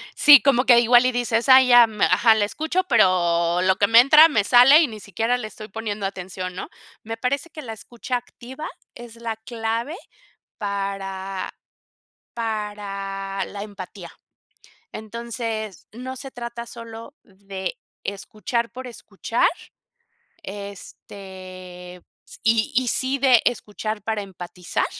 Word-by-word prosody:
Sí, 290 -2 +8
como 265 -2 +3
que 240 -2 +7
igual 240 +1 +5
y 255 - +3
dices: 240 0 -1
"Ay 260 0 +8
ya, 245 -1 +8 0.2
ajá, 225 -2 +5
la 210 -1 +2
escucho, 315 - -2
pero 175 -5 +3
lo 185 0 +3
que 200 - +3
me 230 +2 +7
entra 300 +5 +8
me 220 -9 +1
sale 250 +7 +7
y 315 - +2
ni 220 -3 -9
siquiera 225 +5 -1
le 230 -3 -6
estoy 215 0 -10
poniendo 210 -1 -5
atención", 185 -1 -6
¿no? - - -6 0.3
Me 225 +1 -6
parece 270 +7 -2
que 315 - -9
la 230 -5 -7
escucha 240 +3 -5
activa 250 +3 -9 0.3
es 240 -1 -11
la 230 -1 -5
clave, 230 +5 -4 0.6
para 195 -1 -4 0.8
para 200 -3 -4
la 200 0 -7
empatía. 190 -3 -10 0.8
Entonces, 225 -2 -6
no 255 +4 -7
se 270 +1 -9
trata 235 -1 -7
solo 230 +3 -10
de 190 -1 -7 0.3
escuchar 215 +4 -3
por 255 +2 -8
escuchar, 240 - -1 1.0
este, 185 -2 -10 0.3
s - - -15
y 225 -1 +2
y 255 0 +2
sí 260 +3 0
de 255 -3 +5
escuchar 215 -2 -3
para 220 -1 -2
empatizar, 180 -2 -4
220 Hz, 135 wpm, -22 LUFS, 195-245 Hz, 1.0 s, Sí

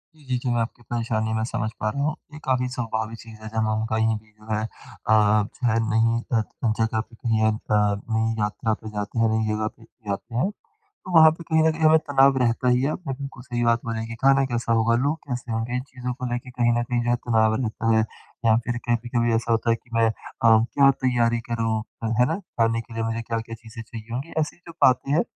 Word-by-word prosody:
जी, 155 - -20
जी, 130 -1 0
जी 125 0 -3
मैं 120 - +1
आपकी 115 +1 -5
परेशानी 115 -2 -1
मैं 110 0 0
समझ 110 - -2
पा 110 - 0
रहा 140 +6 -3
हूँ। 150 +1 0 0.2
ये 150 - -8
काफ़ी 130 -1 +1
स्वाभाविक 115 -2 -3
चीज़ 115 -1 -11
है, 110 - -8
जहाँ 110 -1 0
हम 110 +1 -1
कहीं 110 0 +2
भी 110 0 -25
जो 105 0 -21
है 110 0 0
अ 110 0 -4
अ, 105 -1 +4
जो 120 +4 -4
है 115 - +2
नई 115 +1 +2 0.2
अ, - - +3
त 110 +1 -2
जगह 110 0 +1
पे 115 +1 -7
कहीं 115 -3 0
अ, 110 - +4
नई 110 +1 0
यात्रा 105 +2 0
पे 110 0 -7
जाते 105 +3 -3
हैं 115 -1 +4
नई 110 0 +1
ज़गह 110 0 -1
पे 115 - -17 0.3
जाते 105 +4 -4
हैं, 180 +11 +2 0.4
तो 400 - -12
वहाँ 160 0 +9
पे 170 +1 -8
कहीं 160 -1 +2
न - - +4
कहीं 160 +1 -7
हमें 155 +1 +7
तनाव 135 -1 +5
रहता 120 +2 +1
ही 125 +1 +3
है। 140 - +1
आपने 160 -6 -4
बिल्कुल 135 -3 -7
सही 120 -1 -2
बात 115 0 +3
बोली 115 -1 -2
है 110 - -3
कि 115 - -6
ख़ाना 135 0 +5
कैसा 115 -1 0
होगा 115 +1 +3
लोग 150 +3 +1
कैसे 125 -2 -4
होंगे? 115 +2 -2
इन 125 - 0
चीज़ों 125 -1 -4
को 125 +1 -6
लेके, 120 +1 -3
कहीं 120 -1 +1
न - - 0
कहीं, 120 0 -1
जो 120 - -1
है 120 - +4
तनाव 110 -1 +3
रहता 115 0 0
है। 110 - +4 0.4
या 110 -1 +6
फ़िर 120 0 -2
कभी-कभी 120 0 +1
ऐसा 115 +1 -1
होता 115 +1 +1
है 115 - +4
कि 120 - -18
मैं 115 0 +4
अ, - - +2 0.3
क्या 115 +5 +5 0.2
तैयारी 120 -2 +2
करूँ? 115 -1 0 0.2
अ, 115 - 0
है 125 - +6
ना? - - -3
ख़ाने 115 - 0
के 115 0 -14
लिए 115 - -2
मुझे 115 +1 -2
क्या-क्या 115 0 -4
चीज़ें 115 0 -10
चाहिए 115 0 -10
होंगी। 135 +7 -4
ऐसी 155 +2 -2
जो 175 -1 -13
बातें 130 +2 +3
हैं 165 - +4
115 Hz, 250 wpm, -24 LUFS, 110-125 Hz, 0.4 s, वहाँ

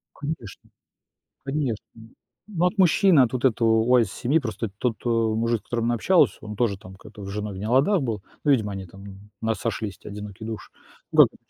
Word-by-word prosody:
Конечно. 145 -8 -7 0.8
Конечно. 135 -5 -2
Н 115 0 -15 0.4
ну 175 - +4
от 190 +4 -1
мужчины, 185 -2 +5
от 125 -3 +4
вот 130 -1 -3
этого 115 -3 +3 0.2
wise 115 - +1
семьи, 130 - +1
просто 115 -5 -4
тот, 120 -1 0
э, - - 0
мужик, 115 0 +1
с - - -34
которым 115 -1 -2
она 120 - +2
общалась, 180 - +3
он 105 -1 -7
тоже 105 -3 0
там 95 0 -12
как-то 105 +1 -12
с - - -7
женой 105 0 -4
в - - -7
не 105 - -4
ладах 140 - +3
был. 110 -6 -3 0.2
Ну, 150 - +3
видимо, 110 -6 +1
они 95 -1 -6
там, 95 +3 -14
м, 100 +1 -12
"у - - -4
нас 110 -2 0
сошлись 105 -3 -3
те - - -11
одинокие 105 +1 -8
души", 110 -1 -6 0.4
ну, - - -3
как - - -8
бы - - -20
115 Hz, 225 wpm, -25 LUFS, 105-130 Hz, 0.8 s, мужчины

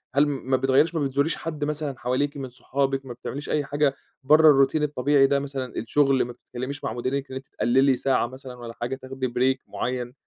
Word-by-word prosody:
هل 145 - +5
ما 130 -2 0
بتغيّريش 135 +6 +3
ما 145 -3 +1
بتزوريش 140 +4 0
حد 155 -2 -5
مثلًا 150 -2 -2
حواليكِ 140 +4 -1
من 130 -2 -5
صحابِك، 135 +1 -2
ما 125 - -6
بتعمليش 140 +4 -7
أي 150 -2 0
حاجة 145 -1 +1 0.3
برّا 150 -1 +7
الroutine 155 +3 -2
الطبيعي 140 -1 +3
ده، 140 0 +2
مثلًا 135 -2 -5
الشغل، 135 +3 +2
ما 120 - -7
بتتكلميش 130 +4 -7
مع - - -2
مديرِك 130 +3 -3
إن - - -6
أنتِ 130 0 -7
تقللي 135 +2 +2
ساعة 130 -2 +1
مثلًا 130 0 -9
والّا 120 -1 -8
حاجة 125 +2 -2
تاخدي 130 0 -4
break 130 +2 +1
معيّن، 120 +4 -3
135 Hz, 200 wpm, -25 LUFS, 130-145 Hz, 0.3 s, برّا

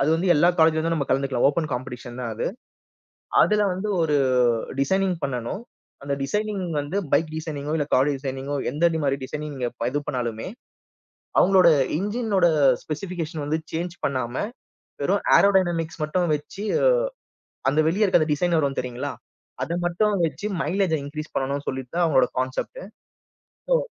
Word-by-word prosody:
அது 140 - +2
வந்து, 175 +3 0
எல்லா 170 +4 +5
காலேஜ்ல 160 0 +5
இருந்தும் 165 +1 0
நம்ம 140 -3 -1
கலந்துக்கலாம், 135 -1 +2
ஓபன் 155 +2 -1
காம்படிஷன் 125 -1 -6
தான் 120 -2 -3
அது. - - -2 1.0
அதுல 210 0 +3
வந்து, 190 +4 -3
ஒரு 150 -2 +2 0.6
டிசைனிங் 190 +5 +1
பண்ணணும். 125 - -3 0.4
அந்த 140 0 -1
டிசைனிங் 210 +4 -2 0.2
வந்து 145 +7 -4 0.2
பைக் 155 +2 +3
டிசைனிங்கோ 150 -2 -4
இல்ல 150 - 0
கார் 135 +3 +4
டிசைனிங்கோ 135 +1 -4
எந்த 155 +6 +3 0.2
மாரி 135 0 +2
டிசைனிங் 150 +2 -5
நீங்க 125 -2 -1 0.2
இது 145 +2 -1
பண்ணாலுமே, 120 -5 -3 0.9
அவங்களோட 185 -1 +6 0.3
இன்ஜினோட 205 -3 +1 0.4
ஸ்பெசிபிகேஷன் 165 -2 -4
வந்து 155 +2 0
சேஞ்ச் 170 +2 -3
பண்ணாம, 130 -2 -2 0.7
வெறும் - - +1
ஏரோடைனமிக்ஸ் 175 -6 +2
மட்டும் 175 +3 0
வச்சு, 150 +8 -6 1.1
அந்த 145 +3 +1
வெளியே 195 +7 +2
இருக்கு 185 -4 +4
அந்த 155 - 0
டிசைனர் 170 +2 +1
வரும் 140 -2 -1
தெரியுங்களா? 125 -1 -4 0.5
அத - - -5
மட்டும் 205 +4 +1
வச்சு 165 - -5 0.2
மைலேஜ்ஜ 180 +1 +1
இன்கிரீஸ் 155 +2 -7
பண்ணனும் 140 +1 -1
சொல்லிட்டு 130 +1 -4
தான் 175 - +2
அவுங்களோட 155 -5 +4
கான்செப்ட். 130 - -3 0.9
ஓ. - - +6
155 Hz, 145 wpm, -24 LUFS, 135-180 Hz, 1.1 s, அவங்களோட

